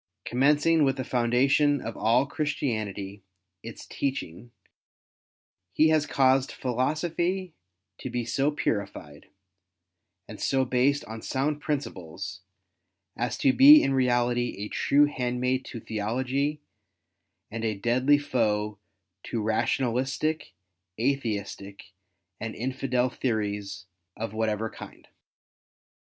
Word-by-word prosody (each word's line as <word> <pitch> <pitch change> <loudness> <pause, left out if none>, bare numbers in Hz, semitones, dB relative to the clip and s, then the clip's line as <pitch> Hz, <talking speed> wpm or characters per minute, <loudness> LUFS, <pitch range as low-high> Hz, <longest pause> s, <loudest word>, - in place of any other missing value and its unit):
Commencing 150 +5 +3
with 135 -1 +1
the 130 - -2
foundation 130 +4 +2
of 115 -2 -6
all 120 +4 +3
Christianity, 110 -10 -3 0.4
its 115 +1 -9
teaching, 120 -6 -4 1.2
he 155 +8 +4
has 155 -2 +2
caused 135 -1 +3
philosophy 165 +8 -1 0.5
to - - -5
be 120 -1 -2
so 135 +5 +1
purified, 100 - -4 1.0
and - - -10
so 135 -1 +1
based 130 +3 +1
on 110 +1 -8
sound 145 +4 -1
principles, 95 - -5 0.7
as - - -2
to 135 - +3
be 295 +3 +9
in 135 - +1
reality 120 -1 +1
a 105 +1 -5
true 145 +1 +3
handmaid 125 -1 -1
to 115 - -7
theology 130 +8 -2 0.9
and 115 +1 -5
a 110 -2 -1
deadly 125 +7 +3
foe 105 -7 -1 0.5
to 115 - -3
rationalistic, 130 +6 -1 0.5
Atheistic, 105 -6 -3 0.5
and 115 0 -5
infidel 130 0 -1
theories 100 -5 -3 0.3
of 115 -1 -4
whatever 110 0 -1
kind. - - -12
125 Hz, 105 wpm, -27 LUFS, 110-140 Hz, 1.2 s, be